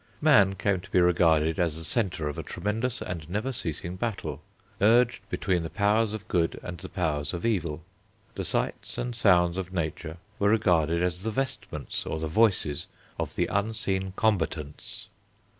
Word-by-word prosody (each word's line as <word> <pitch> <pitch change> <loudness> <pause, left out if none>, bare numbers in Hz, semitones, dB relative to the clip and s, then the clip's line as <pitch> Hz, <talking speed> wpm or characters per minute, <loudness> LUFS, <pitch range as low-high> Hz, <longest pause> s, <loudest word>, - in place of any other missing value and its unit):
Man 105 -11 +5
came 100 0 +1
to 95 - -14
be - - +3
regarded 85 -2 +3
as 85 -3 +1
the 80 - -5
centre 90 -5 0
of 75 - -4
a - - -1
tremendous 110 +7 -2
and 85 -3 -6
never 105 +8 -1
ceasing 85 - -4
battle, 110 -1 -3 0.4
urged 115 -1 +4
between 95 -6 0
the 80 - -4
powers 105 +2 +2
of 110 - -6
good 85 -2 +1
and 90 -2 -6
the - - -8
powers 75 -2 -1
of 85 - -4
evil. 85 -8 -1 0.5
The - - -4
sights - - -2
and 120 -1 -3
sounds 90 -6 +4
of 95 -1 -4
nature 80 -2 -3 0.2
were 100 - +3
regarded 85 -6 +3
as 90 0 -1
the 110 - -2
vestments, 130 - -3
or 80 - -2
the 80 - -2
voices, 90 -6 +2 0.3
of - - -3
the - - +2
unseen 100 -2 -1
combatants. 80 -9 -1
90 Hz, 170 wpm, -27 LUFS, 80-110 Hz, 0.5 s, Man